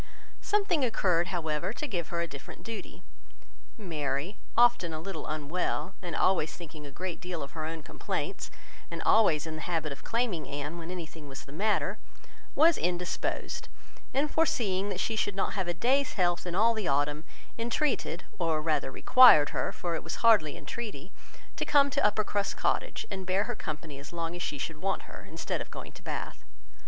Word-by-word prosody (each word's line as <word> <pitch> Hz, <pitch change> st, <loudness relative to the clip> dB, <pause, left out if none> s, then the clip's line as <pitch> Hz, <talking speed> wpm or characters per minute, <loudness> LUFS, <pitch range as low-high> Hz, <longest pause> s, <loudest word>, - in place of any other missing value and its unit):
Something 395 Hz, -8 st, +2 dB
occurred, 180 Hz, -8 st, +2 dB
however, 165 Hz, 0 st, -1 dB
to 300 Hz, -, -4 dB
give 175 Hz, -, -2 dB
her 170 Hz, -1 st, -2 dB
a 170 Hz, -, -1 dB
different 140 Hz, -3 st, -10 dB
duty. 230 Hz, -1 st, -7 dB, 0.7 s
Mary, 155 Hz, -2 st, -2 dB, 0.2 s
often 235 Hz, -8 st, +5 dB
a -, -, -4 dB
little 195 Hz, +4 st, -5 dB
unwell, 155 Hz, +5 st, -1 dB
and 175 Hz, -2 st, -4 dB
always 160 Hz, -4 st, +2 dB
thinking 155 Hz, -3 st, -9 dB
a -, -, -10 dB
great 180 Hz, +3 st, -5 dB
deal 180 Hz, -4 st, -4 dB
of 140 Hz, -, -8 dB
her 160 Hz, -2 st, -4 dB
own 160 Hz, -1 st, -5 dB
complaints, -, -, -3 dB, 0.4 s
and 170 Hz, -, -5 dB
always 170 Hz, -9 st, +5 dB
in 160 Hz, -, -5 dB
the -, -, -6 dB
habit 160 Hz, -3 st, -1 dB
of 140 Hz, -, -8 dB
claiming 225 Hz, -, -1 dB
Anne 145 Hz, +4 st, -4 dB
when 165 Hz, 0 st, -7 dB
anything 165 Hz, -4 st, -7 dB
was 135 Hz, -1 st, -8 dB
the -, -, -12 dB
matter, 205 Hz, +8 st, +1 dB, 0.6 s
was 325 Hz, +2 st, +6 dB
indisposed; 180 Hz, 0 st, -2 dB, 0.4 s
and 280 Hz, +3 st, +1 dB
foreseeing 205 Hz, -, +1 dB
that 190 Hz, -3 st, -3 dB
she 225 Hz, -, 0 dB
should 205 Hz, -2 st, 0 dB
not 195 Hz, -, 0 dB
have 190 Hz, -3 st, -1 dB
a -, -, +1 dB
day's 265 Hz, +9 st, +2 dB
health 175 Hz, -2 st, +1 dB
all 220 Hz, +6 st, +4 dB
the 215 Hz, -4 st, -2 dB
autumn, 145 Hz, +2 st, +1 dB, 0.4 s
entreated, 235 Hz, -, 0 dB, 0.2 s
or 165 Hz, -3 st, +2 dB
rather 155 Hz, -2 st, 0 dB
required 245 Hz, -, +8 dB
her, -, -, -1 dB
for 175 Hz, -2 st, -3 dB
it 165 Hz, -, -2 dB
was 170 Hz, +7 st, -4 dB
hardly 210 Hz, -10 st, +5 dB
entreaty, 205 Hz, -8 st, -6 dB, 0.4 s
to -, -, -1 dB
come 280 Hz, -2 st, +4 dB
to 285 Hz, +1 st, +1 dB
Uppercross 210 Hz, -1 st, +1 dB
Cottage, -, -, 0 dB
and 190 Hz, -2 st, -5 dB
bear 190 Hz, +2 st, +3 dB
her 245 Hz, +1 st, -3 dB
company 150 Hz, -4 st, -6 dB
as 140 Hz, -, -10 dB
long 170 Hz, 0 st, -3 dB
as 175 Hz, -, -5 dB
she 145 Hz, -, -2 dB
should 155 Hz, +3 st, -4 dB
want 195 Hz, -, 0 dB
her, -, -, -11 dB
instead -, -, -3 dB
of -, -, -6 dB
going -, -, -8 dB
to -, -, -14 dB
Bath. -, -, -5 dB
175 Hz, 185 wpm, -30 LUFS, 155-215 Hz, 0.7 s, required